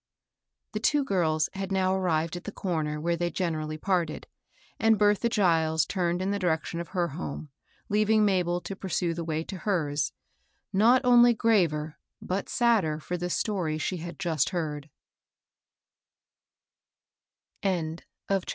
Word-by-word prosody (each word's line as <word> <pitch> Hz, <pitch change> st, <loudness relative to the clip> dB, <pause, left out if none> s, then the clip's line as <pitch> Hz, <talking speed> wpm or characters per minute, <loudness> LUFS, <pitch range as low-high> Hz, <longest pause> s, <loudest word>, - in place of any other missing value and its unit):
The -, -, -3 dB
two 295 Hz, -1 st, +2 dB
girls 160 Hz, -, +1 dB
had 195 Hz, 0 st, -5 dB
now 190 Hz, -1 st, +2 dB
arrived 170 Hz, -3 st, 0 dB
at 175 Hz, -, -8 dB
the 210 Hz, -, -4 dB
comer 155 Hz, -6 st, -2 dB
where^'they 170 Hz, +2 st, -1 dB
generally 155 Hz, -4 st, -2 dB
parted; 170 Hz, -3 st, -1 dB, 0.5 s
and 225 Hz, -1 st, +4 dB
Bertha 210 Hz, +3 st, +3 dB
Giles 165 Hz, -7 st, +2 dB
turned 175 Hz, -1 st, -1 dB
in 195 Hz, -, 0 dB
the 200 Hz, -, -1 dB
direction 170 Hz, -2 st, -1 dB
of 170 Hz, -, -5 dB
her 175 Hz, -3 st, -1 dB
home, 150 Hz, 0 st, -6 dB, 0.4 s
leaving 215 Hz, +1 st, +3 dB
Ma 190 Hz, -3 st, +3 dB
bel 175 Hz, 0 st, -1 dB
to 195 Hz, -, -6 dB
pursue 180 Hz, -3 st, -1 dB
the 170 Hz, 0 st, -4 dB
way 160 Hz, -1 st, -2 dB
to 190 Hz, -, -7 dB
hers, 155 Hz, -8 st, 0 dB, 0.6 s
not 240 Hz, +6 st, +4 dB
only 240 Hz, -1 st, +6 dB
graver 165 Hz, -10 st, +1 dB, 0.2 s
but 190 Hz, +2 st, -3 dB
sadder 220 Hz, -11 st, +2 dB
^for 175 Hz, +3 st, -4 dB
the 175 Hz, +1 st, -2 dB
story 180 Hz, -5 st, -1 dB
sh6 180 Hz, +3 st, -2 dB
had 170 Hz, +1 st, -7 dB
just 160 Hz, -6 st, 0 dB
heard 155 Hz, -4 st, -4 dB, 2.7 s
CMAFTEB 170 Hz, -4 st, -1 dB
V. -, -, -24 dB, 0.3 s
HICDA. 195 Hz, -2 st, 0 dB
175 Hz, 150 wpm, -27 LUFS, 160-200 Hz, 2.7 s, only